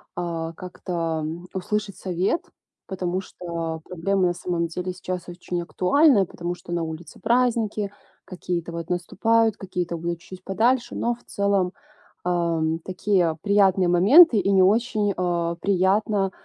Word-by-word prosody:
а, 165 -2 -3
как-то 165 -3 -4 0.3
услышать 200 +1 -2
совет, 185 - -1 0.4
потому 185 -1 -2
что 170 -3 -5
проблема 185 +2 0
на 175 - 0
самом 170 -1 -2
деле 180 +2 -4
сейчас 180 -1 -5
очень 175 0 -4
актуальная, 205 - +3
потому 175 0 -5
что 175 - -12
на 170 -1 0
улице 160 +1 -8
праздники, 230 -4 +1 0.3
какие-то 175 -2 -4
вот 170 0 -6
наступают, 220 +5 +1
какие-то 180 -3 -3
будут 170 0 -3
чуть-чуть 185 +1 -12
подальше, 235 +6 +1
но 240 0 0
в 240 - -24
целом, 200 -2 0 0.5
ам, 165 -2 0
такие 185 -3 +1
приятные 195 -3 +3
моменты, 220 - +7
и 195 0 +2
не 190 - +5
очень, 210 0 +2
э, 170 -1 0
приятно 195 +1 +2
185 Hz, 135 wpm, -24 LUFS, 170-200 Hz, 0.5 s, моменты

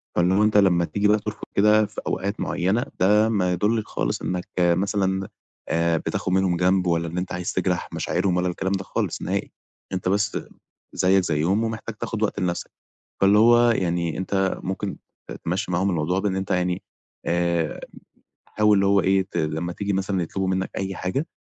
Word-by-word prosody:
فإنه 95 +4 +3
أنت 105 -1 +3
لمّا 90 -4 +4
تيجي 105 +3 0
ترفض 105 0 0
كده 105 +1 +5
في - - -7
أوقات 100 +3 -2
معينة، 100 +7 0
ده 105 +4 +4
ما 95 -5 +1
يدُلِّش 105 +4 0
خالص - - -2
إنّك 90 -1 -3
مثلًا 95 +2 +1 0.4
آآ، 85 0 +2
بتاخد 90 - -3
منهم 95 -2 +2
جنب 90 0 +2
ولا 85 0 +1
إن 85 +2 -5
أنت 90 0 -3
عايز 90 0 -3
تجرح 90 -1 -1
مشاعرهم 90 0 0
ولا 90 0 +1
الكلام 95 +2 -2
ده 95 0 -2
خالص - - -3
نهائي. - - -2 0.4
أنت 90 0 -1
بس 100 +1 +1 0.6
زيّك 95 0 +3
زيُّهم 85 +7 +1
ومحتاج 110 0 -5
تاخد 110 -1 -3
وقت 105 - -1
لنفسك، 90 -2 -2 0.5
فاللي 100 +2 +5
هو 120 +1 +6
يعني 85 -5 0
أنت 95 0 0
ممكن 95 +1 -3 0.3
ت - - -5
تمشي 90 +4 -2
معاهم 95 +3 +1
الموضوع 90 +2 0
بإن 100 -2 -1
أنت 95 -1 -4
يعني 90 0 0 0.4
آآ، 85 -2 0 0.7
حاول 105 -1 +3
اللي 100 - +2
هو 100 0 +4
إيه 95 +1 +3
ت - - -4
لما 80 +2 -2
تيجي 100 -1 -2
مثلًا 95 -1 0
يطلبوا 95 +3 -3
منّك 95 0 -1
أي 95 -1 -3
حاجة 135 - -2
95 Hz, 175 wpm, -24 LUFS, 90-100 Hz, 0.7 s, هو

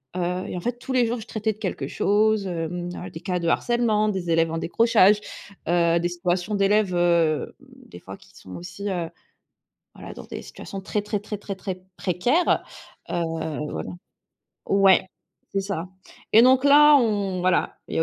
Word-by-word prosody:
heu 180 +1 -2
et - - -5
en - - -5
fait, 245 +3 -3
tous 260 - -5
les 250 -2 +3
jours, 235 +1 -2
je 215 - -11
traitais 220 0 -2
de 215 - -25
quelque - - -3
chose, 210 -1 +1
hem, 175 +1 -4
à 180 - -7
des 160 - -8
cas 180 -1 -2
de 170 -1 -3
harcèlement, 220 +1 +1
des 180 -4 -2
élèves 165 0 +3
en 165 - -3
décrochage, 210 +2 +3 0.5
heu, 170 -1 +3
des 175 +1 -1
situations 180 +3 -2
d'élèves, 200 -1 +2
heu, 170 -3 +1
des 90 - -15
fois, 95 +1 -10
qui - - -21
sont 95 - -11
aussi, 190 +3 -6
heu 175 -3 -3 0.9
heu, - - -9
dans - - -9
des - - -8
situations 195 -1 -9
très, 210 +2 -2
très, 210 0 -3
très, 210 +1 -6
très, 200 -1 -6
très 185 -1 -6 0.2
précaires, 245 - +1 0.5
heu, - - -5 0.6
voilà - - -5 0.8
ouais, 195 -1 +4 0.5
c'est 195 - 0
ça 190 -3 -4 0.4
et 225 +2 +8
donc 260 +1 +5
là, 295 +1 +7
on 205 -7 0
voilà, 180 -1 +1
il - - -4
y - - +1
a - - +4
195 Hz, 185 wpm, -24 LUFS, 175-215 Hz, 0.9 s, et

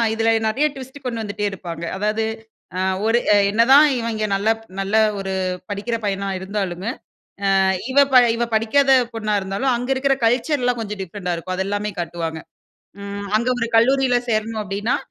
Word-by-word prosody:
இதுல 225 0 +2 0.2
நெறைய 260 +7 +1
ட்விஸ்ட்டு 265 +1 -10
கொண்டு 235 -2 -3
வந்துட்டே 205 0 -3
இருப்பாங்க. 170 -3 -7
அதாவது, 215 +2 0 0.5
அ - - -1 0.3
ஒரு 230 +2 +3 0.3
என்னதான் 260 +7 +6
இவங்க 230 -2 -2
நல்ல 200 +3 0 0.3
நல்ல 195 +2 -1 0.2
ஒரு 195 -1 -3 0.4
படிக்கிற 210 +4 -2
பையனா 200 0 -2
இருந்தாலுமே, 190 0 -3 0.7
அ - - +4 0.3
இவ 265 - -3 0.2
ப - - +5 0.2
இவ 235 - 0
படிக்காத 270 +5 +3 0.2
பொண்ணா 215 -2 -1
இருந்தாலும், 195 +8 -1
அங்க 245 +2 -5
இருக்கற 270 +1 +2
கல்ச்சர்லாம் 245 +1 +1
கொஞ்சம் 210 -2 -5
டிஃப்ரெண்ட்டா 180 -1 -4
இருக்கும். 185 +2 -5
அதெல்லாமே 205 +2 -2
காட்டுவாங்க. 165 -1 -4 0.6
ம் 200 0 -6
அங்க 235 - -2
ஒரு 230 - 0
கல்லூரியில 260 +2 +3
சேரணும் 220 0 -1
அப்டின்னா, 205 +4 -1
215 Hz, 150 wpm, -21 LUFS, 195-240 Hz, 0.7 s, என்னதான்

